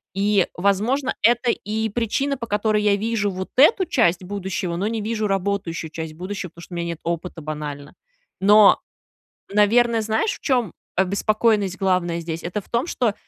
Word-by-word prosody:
И, 200 -1 +2
возможно, 215 +9 +1
это 240 +1 +3
и 220 0 -2
причина, 240 +6 -1
по 235 - -5
которой 210 0 +1
я 205 -1 +4
вижу 210 -1 -1
вот 185 0 -5
эту 345 - +6
часть 220 - +2
будущего, 190 -2 -3
но 190 +4 -1
не 225 0 -2
вижу 215 0 -2
работающую 195 -4 -2
часть 160 -1 -6
будущего, 185 +2 -5
потому 170 +2 -14
что 180 - -12
у - - -4
меня 170 0 -2
нет 170 -2 -5
опыта 170 0 -4
банально. 150 -1 -6 0.5
Но, 205 +1 +7 0.7
наверно, 225 +3 +4
знаешь, 220 - 0
в - - -9
чем 245 - 0 0.2
обеспокоенность 200 +1 +1
главная 180 -3 +1
здесь? 165 0 -5
Это 175 +4 -3
в - - -21
том, 235 +5 0
что 230 -9 0
200 Hz, 170 wpm, -22 LUFS, 180-225 Hz, 0.7 s, Но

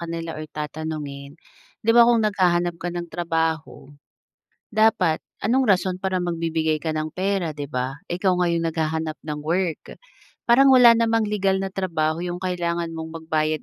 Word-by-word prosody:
kanila 165 -1 -5
or 155 - -5
tatanungin, 150 -2 -5 0.5
'di 230 - +2
ba 235 - +9
kung 235 -1 +4
naghahanap 175 -4 +1
ka 175 - -2
ng 175 -1 -5
trabaho, 165 -2 -1 1.1
dapat 190 -7 +3 0.3
anong 260 +3 +3
rason 185 -1 +2
para 190 -1 0
magbibigay 165 -2 -1
ka 160 - 0
ng 155 0 -2
pera, 190 -2 0
'di 145 -1 -4
ba? 125 +1 0 0.3
Ikaw 185 +1 +1
nga 180 - +1
yung 165 0 0
naghahanap 160 -1 -2
ng 150 -1 -4
work. 175 -2 0 0.7
Parang 265 +4 +6
wala 245 -2 +8
namang 225 -1 +2
legal 195 -2 +1
na 195 0 -3
trabaho 165 -4 -1
yung 175 0 -4
kailangan 170 -2 -2
mong 160 0 -6
magbayad 155 -1 0
170 Hz, 160 wpm, -23 LUFS, 160-190 Hz, 1.1 s, ba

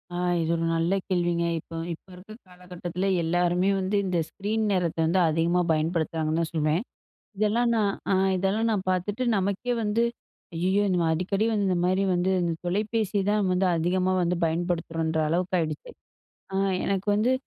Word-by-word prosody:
ஆ - - -2 0.2
இது 160 - 0
ஒரு 165 - -1
நல்ல 165 +4 +1
கேள்விங்க. 175 -2 +1
இப்போ 165 - -11 0.2
இப்போ 165 - -14
இருக்கிற 200 +4 -12
காலகட்டத்தில 180 0 -5 0.2
எல்லாருமே 175 +2 +1
வந்து 190 +2 -1
இந்த 180 -2 0
ஸ்க்ரீன் 215 +2 -2
நேரத்த 180 -4 0
வந்து 175 +4 +2
அதிகமாக 170 +3 +1
பயன்படுத்துறாங்கன்னு 160 0 0
தான் 165 - -2
சொல்லுவேன். 155 +1 +1
அ - - -43 0.5
இதெல்லாம் 220 +3 +2
நான், 205 -3 +1 0.2
அ - - +4 0.2
இதெல்லாம் 200 +5 +1
நான் 205 -3 0
பார்த்துட்டு 190 +6 -1
நமக்கே 200 +6 -1
வந்து 215 +2 +1 0.5
"ஐயயோ! 185 +4 +1
இந்த 180 -1 +1
அடிக்கடி 195 +6 0
வந்து 210 -2 +1
இந்த 180 - +1
மாதிரி 185 +2 +2
வந்து 180 +2 +1
இந்த 170 -1 0
தொலைபேசி 210 +2 0
தான் 210 -2 +1
வந்து 180 +1 +2
அதிகமா 180 +3 +1
வந்து 175 0 +1
பயன்படுத்துறோம்ன்ற" 165 -1 -1
அளவுக்கு 180 +3 0
ஆகிடுச்சு. 155 -2 -4 0.6
ஆ - - 0 0.3
எனக்கு 195 +1 -1
வந்து 220 +5 +2
180 Hz, 160 wpm, -26 LUFS, 170-200 Hz, 0.6 s, அ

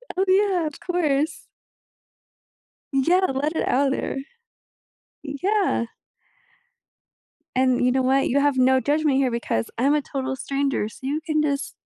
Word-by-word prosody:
Oh, 380 - +2
yeah, 380 -3 +3
of 300 - -8
course. 315 -4 -1 1.5
Yeah, 350 +8 +3
let 295 +4 -1
it - - -1
out, 270 +1 +2
er - - -3 1.1
Yeah. 360 - 0 1.7
And 255 -1 +2
you 250 - +3
know 260 +1 +1
what? 270 +1 +2
You 280 +3 +2
have 285 -2 +2
no 260 +1 +4
judgment 295 0 +1
here 260 -3 +2
because 175 - -2
I'm 280 +5 +3
a 300 - +1
total 265 -1 -4
stranger, 275 -5 -1
so - - -15
you 295 +4 -2
can 310 -2 +1
just 285 -2 -2
280 Hz, 140 wpm, -23 LUFS, 265-310 Hz, 1.7 s, no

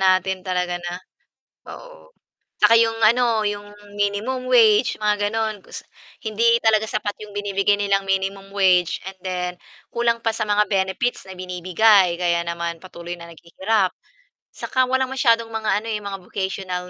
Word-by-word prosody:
natin 185 0 +2
talaga 180 -1 -1
na 175 0 -6 0.8
oo. - - -13 0.5
Tsaka 210 +2 +6
'yong 225 0 +2
ano 230 0 +4
'yong 205 0 -3 0.3
minimum 220 +6 -1
wage 225 -2 +5
mga 205 -1 +1
gano'n 220 -1 -2
kus - - -8 0.4
hindi 230 +2 +3
talaga 220 -1 +3
sapat 210 -1 -2
'yong 210 -1 -10
binibigay 205 0 +1
nilang 200 -1 +1
minimum 195 +1 -2
wage 185 -3 +2
and 190 0 -11
then 180 -1 -2 0.4
kulang 235 -1 +1
pa 225 - +1
sa 220 -1 -2
mga 210 0 +3
benefits 190 +4 -1
na 190 - -9
binibigay 185 +1 +3
kaya 170 -1 +1
naman 170 0 -3
patuloy 175 -1 -8
na 170 - -10
naghihirap. 190 +4 -1 0.6
Saka 260 - 0
walang 260 0 0
masyadong 230 -4 +2
mga 220 -1 0
ano - - -8
eh, 210 - -2
mga 200 -1 -5
vocational 190 -2 -4
205 Hz, 155 wpm, -22 LUFS, 185-225 Hz, 0.8 s, Tsaka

